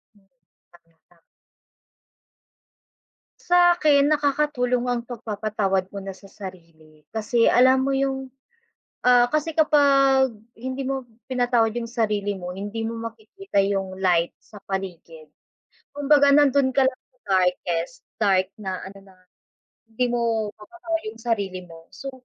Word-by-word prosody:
Hmm, 195 -2 -28 0.4
saglit 165 -1 -25
lang. 170 -1 -27 2.2
Sakin 345 -5 +4
nakakatulong 275 -4 +1
ang 245 -1 0
pagpapatawad 210 -5 -2
muna 195 -1 -6
sa - - -17
sarili. 165 -6 -13
Kasi 225 +2 +1
alam 260 +1 +5
mo 275 - 0
yung 270 -1 -2 0.7
ah, 245 0 +5
kasi 305 +1 -1
kapag 275 -3 +4 0.3
hindi 260 +2 -4
mo 265 -1 -3 0.2
pinatawad 245 -3 +2
yung 230 - -5
sarili 210 -4 -1
mo, 180 -1 -6
hindi 205 +4 -5
mo 230 0 -4
makikita 225 - -3
yung 195 -1 -2
light 175 -3 +1
sa 210 - -14
paligid. 170 -5 -6 0.6
Kumbaga 285 0 +4
nandun 280 -2 +4
ka 265 0 +3
lang 255 - -7
sa 255 - -37 0.2
darkest, 180 +1 -1 0.2
dark 190 -3 +2
na 190 -3 -5
ano 195 +1 -10
na, - - -23 0.7
hindi 225 +3 -1
mo 230 -3 0
mababa 335 - -5
yung 215 - -6
sarili 200 -6 -2
mo. 165 -1 -15
So, 270 +7 -8
230 Hz, 125 wpm, -23 LUFS, 195-270 Hz, 2.2 s, alam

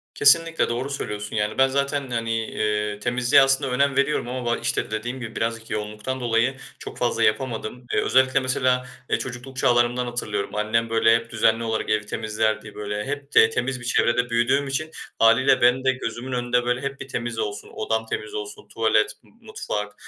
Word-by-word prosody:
Kesinlikle, 165 +3 +4
doğru 125 +4 -2
söylüyorsun. 105 -6 -5
Yani 105 0 -1
ben 135 0 +5
zaten 140 0 -1
hani, 115 -1 -1
eee, 105 -1 -1
temizliğe 125 +3 +4
aslında 135 0 +1
önem 140 +2 +2
veriyorum 140 -2 +1
ama 125 0 -4
ba 120 0 +1
işte - - -2
dediğim 120 +4 -3
gibi 115 -2 -7
birazcık 115 0 -3
yoğunluktan 105 +5 -4
dolayı 120 +2 +1 0.2
çok - - -9
fazla - - 0
yapamadım. 115 +1 -1
Eee, - - +3
özellikle 130 +1 +3
mesela, 130 -1 0 0.2
eee, - - +1
çocukluk 130 +1 -7
çağlarımdan 120 0 +2
hatırlıyorum. 105 -5 -3
Annem 110 +2 0
böyle 115 0 +4
hep 115 0 -3
düzenli 110 +1 +2
olarak 110 -1 -2
evi 105 -1 +1
temizlerdi. 110 0 -2
Böyle 105 0 -4
hep 145 +1 -5
de 110 - +7
temiz 125 +3 -2
bir 120 - -10
çevrede 120 0 +2
büyüdüğüm 125 +4 +2
için 155 +4 -3 0.3
hâliyle 115 +5 +5
benim 125 +2 +4
de 130 - +5
gözümün 125 0 -5
önünde 125 0 0
böyle 125 +1 0
hep 140 0 -4
bir - - -7
temiz 120 -3 -4
olsun, 105 -2 -4
odam 110 +1 -1
temiz 110 -1 -5
olsun, 105 0 -7
tuvalet, 110 -1 +2
m - - -23 0.2
mutfak, 105 - -4
120 Hz, 180 wpm, -23 LUFS, 110-130 Hz, 0.3 s, de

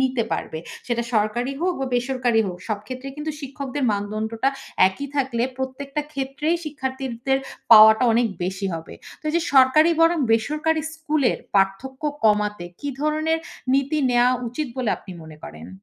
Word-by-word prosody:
নিতে 260 -3 +1
পারবে। 160 - -3 0.3
সেটা 235 -1 0
সরকারি 235 +5 0
হোক 360 0 +1
বা 270 - -1
বেসরকারি 245 -2 +1
হোক, 180 -1 -5
সব 210 -2 -1
ক্ষেত্রে 255 +1 -6
কিন্তু 305 +1 -3
শিক্ষকদের 275 0 -4
মানদণ্ডটা 215 +4 -1 0.4
একই 280 +9 -6
থাকলে 255 -4 0
প্রত্যেকটা 275 +2 -4
ক্ষেত্রেই 275 +4 -1
শিক্ষার্থীদের 265 -3 -2 0.3
পাওয়াটা 220 +2 +9
অনেক 235 +1 +3 0.2
বেশি 190 +2 -3
হবে। 165 0 -8 0.3
তো - - -36
এইযে 340 +2 +1
সরকারি 270 +5 +6
বনাম 330 -1 +4
বেসরকারি 305 +7 +1
স্কুলের 310 -5 0 0.2
পার্থক্য 195 +9 0 0.2
কমাতে 210 -3 +2 0.2
কী 285 - -4
ধরনের 310 +2 +1 0.4
নীতি 280 +3 +1
নেওয়া 245 +1 +4 0.2
উচিত 300 +6 -3
বলে 245 -5 0
আপনি 185 - -11
মনে 155 -1 -12
করেন? 80 +3 -10
260 Hz, 150 wpm, -23 LUFS, 220-290 Hz, 0.4 s, পাওয়াটা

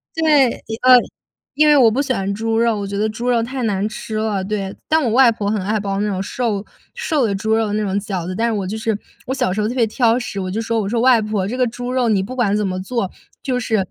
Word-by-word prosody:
对， 300 -6 +4 0.3
呃， 255 0 +8 0.6
因 305 +1 +4
为 295 - +6
我 235 -4 +6
不 265 +6 0
喜 270 -2 -1
欢 195 -3 -2
猪 225 +2 -1
肉， 230 -2 +2
我 200 - -4
觉 200 - -4
得 215 +1 +1
猪 235 +3 -3
肉 235 -2 +2
太 255 +1 -4
难 205 -2 0
吃 215 0 -7
了。 215 -3 -1
对 195 -1 -3
但 315 -1 +2
我 235 - +1
外 255 +1 +6
婆 205 -2 -2
很 210 -3 -1
爱 215 +3 0
包 195 -1 -2
那 210 - 0
种 190 -1 -2
瘦 215 -3 -2 0.3
瘦 310 - 0
的 200 - -1
猪 220 +3 -2
肉 220 -2 0
那 215 0 0
种 200 0 -1
饺 190 -4 -4
子。 185 - -3
但 230 +4 +1
是 230 - 0
我 200 -3 -2
就 215 +3 -4
是 220 -1 -1 0.3
我 260 - -1
小 250 -8 0
时 215 - -3
候 210 - 0
特 245 - -4
别 240 -3 +3
挑 235 +1 +2
食， 205 -5 -5
我 185 -1 -3
就 220 +3 -2
说 230 0 -1
我 195 - -3
说： 230 0 0
“外 250 -3 +5
婆 210 -3 -1
这 245 +5 -4
个 250 -1 +2
猪 245 +2 -5
肉， 255 -2 +1
你 195 -3 +2
不 255 - -7
管 210 -5 +1
怎 210 - 0
么 185 0 -3
做， 215 -2 -2 0.3
就 250 -2 -1
是 225 -2 0
220 Hz, 300 characters per minute, -19 LUFS, 200-245 Hz, 0.6 s, 呃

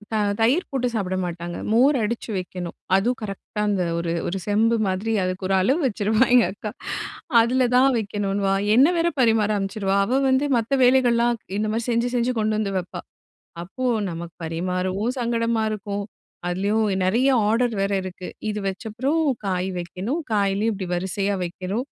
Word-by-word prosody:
அ - - +2 0.2
தயிர் 265 +11 +3
போட்டு 255 -2 0
சாப்பிட 185 -3 -1
மாட்டாங்க. 175 0 -5 0.2
மோர் 265 +6 +5
அடுச்சி 230 +2 -3
வைக்கணும். 180 -1 -5 0.2
அதுவும் 240 +6 +1
கரெக்டா 210 0 -5
அந்த 195 -3 +1 0.2
ஒரு 170 0 -2 0.2
ஒரு 195 - -2
செம்பு 225 +3 +3
மாதிரி. 190 +4 -1
அதுக்கு 185 +1 -3
ஒரு 195 - +3
அளவு 265 - +2
வச்சுருவா 215 +2 +2
எங்க 245 -2 +6
அக்கா. 210 +1 -6 0.7
அதில 250 +2 +2
தான் 265 +2 +5
வைக்கணுன்னுவா. 200 -2 -1 0.2
என்னை 275 +8 +6
வேற 335 0 +2
பரிமாற 220 -3 +3
அனுமிச்சிருவா. 195 0 -1
அவ 255 +6 +1
வந்து 260 +2 +2
மத்த 235 +4 0
வேலைகள்லாம் 240 -2 +4 0.2
இந்த 215 0 0
மாரி 225 +1 -1
செஞ்சு 235 +1 +1
செஞ்சு 245 +1 +1
கொண்டு 215 0 +1
வந்து 200 -2 -2
வைப்பா. 175 -1 -7 0.6
அப்போ 195 +9 -5 0.3
நமக்கு 170 +1 -7
பரிமாறவும் 185 +7 -2
சங்கடமா 230 -1 0
இருக்கும். 205 -1 -4 0.4
அதுலேயும் 200 +5 +1 0.2
நெறைய 235 +8 +3 0.2
ஆர்டர் 235 +1 +2
வேற 200 0 0
இருக்கு. 185 -1 -7 0.2
இது 210 - -2
வச்சப்பறம் 230 +11 -1 0.2
காய் 185 0 -1
வைக்கணும். 185 - -3
காய்லயும் 200 +2 +1
இப்படி 190 -2 -5
வரிசையா 195 +3 -1
வைக்கணும். 190 +7 -4
210 Hz, 155 wpm, -23 LUFS, 190-235 Hz, 0.7 s, எங்க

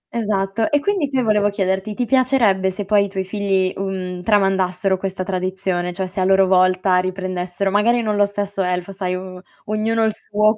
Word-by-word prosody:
Esatto. 210 +3 -1
E 290 - +3
quindi 350 -4 -1
qui 260 -2 0
volevo 210 -2 +2
chiederti: 195 +1 -2
ti 245 - -1
piacerebbe 240 -8 +3
se 195 +1 -5
poi 200 0 +3
i - - -7
tuoi 190 -1 -3
figli, 190 -1 0
uhm, 185 -2 -4
tramandassero 195 -1 +1
questa 190 0 -4
tradizione? 185 -1 -2
Cioè 190 +1 -3
se 185 +1 -6
a - - +2
loro 190 0 +4
volta 185 0 +3
riprendessero, 185 +1 -2
magari 230 +4 +2
non 210 -1 0
lo 205 0 +4
stesso 200 -1 -3
elfo, 180 +1 -2
sai 185 -1 -3
o 185 0 -8 0.2
ognuno 220 +2 0
il 220 - +2
suo. 210 +1 +1
195 Hz, 185 wpm, -20 LUFS, 185-210 Hz, 0.2 s, loro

